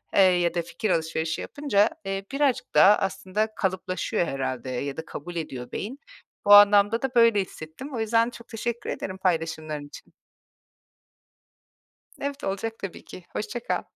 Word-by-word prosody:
eee, 195 - +7
ya 175 -2 +4
da 175 - 0
fikir 170 +5 -4
alışverişi 160 -1 -1
yapınca, 275 -9 +1 0.2
eee, 195 0 -3
birazcık 275 -2 0
daha 205 +2 +8
aslında 200 +3 -2
kalıplaşıyor 185 -2 -1
herhâlde 130 -2 -3
ya 135 +3 -3
da 160 - -5
kabul 175 +4 -8
ediyor 130 -7 -5
beyin. 255 +8 -5 0.5
Bu 205 - +7
anlamda 205 +2 +7
da 265 -1 -3
böyle 230 -4 +5
hissettim. 185 - -9
O - - -3
yüzden 230 +1 +2
çok 235 -1 -13
teşekkür 235 +1 -4
ederim 190 0 -4
paylaşımların 160 -4 -2
için. - - -14 2.1
Evet, 280 0 -4
olacak 220 +4 -3
tabii 195 -3 -7
ki. 185 - -11
Hoşça 240 +3 -3
kal. - - -2
195 Hz, 150 wpm, -26 LUFS, 165-230 Hz, 2.1 s, daha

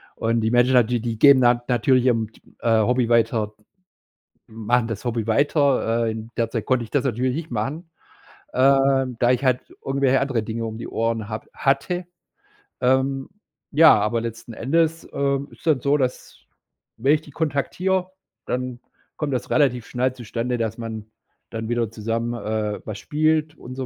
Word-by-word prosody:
Und 115 0 0
die 110 0 0
Menschen 120 +1 +4
dann 125 -3 +5
die 120 -1 -1
die 115 -1 -3
gehen 140 -1 +7
dann 120 -1 +4
natürlich 125 +1 +2
ihrem, 115 -4 +1
t - - -22 0.2
äh, 115 -2 +3
Hobby 120 +1 +1
weiter 115 -2 +2 0.9
machen 115 +2 0
das 115 -1 -5
Hobby 115 -3 -2
weiter, 130 -2 +2
äh, - - 0
in 110 +1 -7
der 115 -1 0
Zeit 115 -3 -3
konnte 130 -2 +1
ich 110 - -13
das 140 -2 +1
natürlich 125 0 0
nicht 160 +2 -5
machen, 135 +10 -4 0.6
ähm, 135 -1 +3
da 120 0 +4
ich 125 +1 0
halt 130 -2 +2 0.2
irgendwelche 135 -1 +2
andere 135 -5 -1
Dinge 115 +1 -4
um 110 -1 -5
die 115 - -6
Ohren 115 -2 -2
habe 110 -1 -6
hatte. 175 +7 0 0.8
Ähm, 135 +1 +1 0.4
ja, 160 +2 +7
aber 110 +3 0
letzten 115 0 -7
Endes, 165 +7 0
ähm, 140 0 0
ist - - -18
dann 150 -4 +4
so, 140 +2 +2
dass, 130 -3 -3 0.6
wenn 135 +6 +3
ich 155 - -4
die 150 - -15
kontaktiere, 180 +6 -1 0.3
dann 125 -1 -3 0.4
kommt 150 -3 -2
das 125 - -3
relativ 125 -5 +2
schnell 125 +1 0
zustande, 120 0 -3
dass 115 -1 -2
man 110 -2 -6 0.5
dann 110 0 -5
wieder 120 -2 0
zusammen, 115 +1 -2
äh, 110 -2 -3
was 105 -2 -5
spielt 155 +1 0
und 130 +1 -9
so 130 0 -4
125 Hz, 175 wpm, -23 LUFS, 115-135 Hz, 0.9 s, gehen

